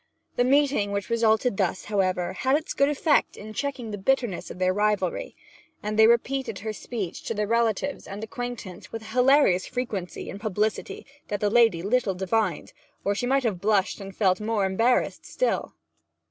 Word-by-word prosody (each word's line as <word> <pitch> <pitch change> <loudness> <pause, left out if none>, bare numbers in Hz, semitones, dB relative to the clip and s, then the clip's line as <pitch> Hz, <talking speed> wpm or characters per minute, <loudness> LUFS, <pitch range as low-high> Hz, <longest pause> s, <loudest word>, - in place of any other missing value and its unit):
The 245 - +3
meeting 270 -6 +2
which 200 +2 -3
resulted 225 -1 +2
thus, 185 -2 -1
however, 185 -3 0
had 260 +8 +2
its 315 - -5
good 280 +1 +3
effect 295 +1 +2
in 215 +1 -9
checking 260 -2 -3
the 205 - -5
bitterness 240 -3 0
of - - -8
their 185 0 +2
rivalry; 205 -3 0 0.5
and 210 +1 -2
they 220 0 +7
repeated 235 -1 +1
her 220 +2 -4
speech 210 -5 -5
to 230 - -2
their 210 0 0
relatives 230 +4 0
and 205 +2 -7
acquaintance 225 -6 -6
with 225 -1 -6
a 220 0 -10
hilarious 250 -7 +4
frequency 220 -8 -4
and 200 - -7
publicity 215 0 -2 0.2
that 205 - -2
the 205 0 +1
lady 225 -8 +4
little 210 -2 +1
divined, 190 +4 -1 0.3
or 200 - +2
she 245 +4 -2
might 270 +1 +2
have 205 -7 -1
blushed 205 -1 +1
and 195 0 -8
felt 190 -2 +2
more 215 -2 0
embarrassment 225 +6 +1
still. - - -1
215 Hz, 175 wpm, -26 LUFS, 195-245 Hz, 0.5 s, they